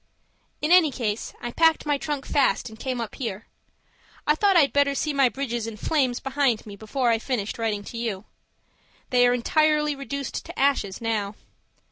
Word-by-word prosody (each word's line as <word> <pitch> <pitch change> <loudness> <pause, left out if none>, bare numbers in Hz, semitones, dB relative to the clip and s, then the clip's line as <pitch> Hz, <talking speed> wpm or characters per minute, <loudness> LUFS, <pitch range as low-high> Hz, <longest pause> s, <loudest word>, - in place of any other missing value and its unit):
In 305 - +1
any 355 -4 +7
case, 230 -5 -3
I 240 - -3
packed 325 +3 +3
my 290 -2 +1
trunk 290 -2 -3
fast 270 -3 +1
and 220 0 -13
came 255 -2 -3
up 230 -3 -4
here. 225 -5 -5 0.8
I 300 - +4
thought 390 +3 +3
I'd 285 -4 +4
better 285 -1 +3
see 300 +2 -1
my 275 -3 +4
bridges 240 -4 -3
in 225 -2 -7
flames 260 0 0
behind 270 -4 0
me 205 -2 -9
before 235 +4 0
I 225 - +2
finished 230 -3 -3
writing 215 -3 -1
to 230 - -8
you. 215 -4 -3 0.9
They 245 -1 +5
are 245 - +3
entirely 300 +3 +2
reduced 275 0 -5
to - - -10
ashes 265 -9 +1
now. 215 -3 -2
255 Hz, 180 wpm, -25 LUFS, 225-285 Hz, 0.9 s, any